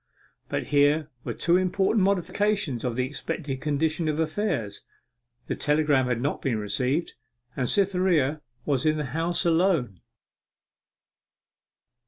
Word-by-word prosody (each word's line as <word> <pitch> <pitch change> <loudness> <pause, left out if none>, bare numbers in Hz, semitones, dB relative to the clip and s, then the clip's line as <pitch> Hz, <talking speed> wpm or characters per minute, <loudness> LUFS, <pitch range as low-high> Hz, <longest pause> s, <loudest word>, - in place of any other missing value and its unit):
But - - -3
here 145 +2 +3
were - - -4
two 170 +1 +3
important 190 +3 +2
modifications 200 - 0
of 125 -3 -2
the 125 0 0
expected 145 -1 -5
condition 155 +2 0
of 155 0 -1
affairs. 155 - -2 0.6
The - - -3
telegram 150 -3 +2
had 125 -2 0
not 140 +4 -2
been 125 -5 0
received, 125 - -1 0.4
and 125 -2 -1
Cytherea 180 -7 +2 0.2
was 140 -4 +1
in 155 0 +2
the 150 - -2
house 170 +2 0
alone. 165 - +1
155 Hz, 125 wpm, -26 LUFS, 135-175 Hz, 0.6 s, here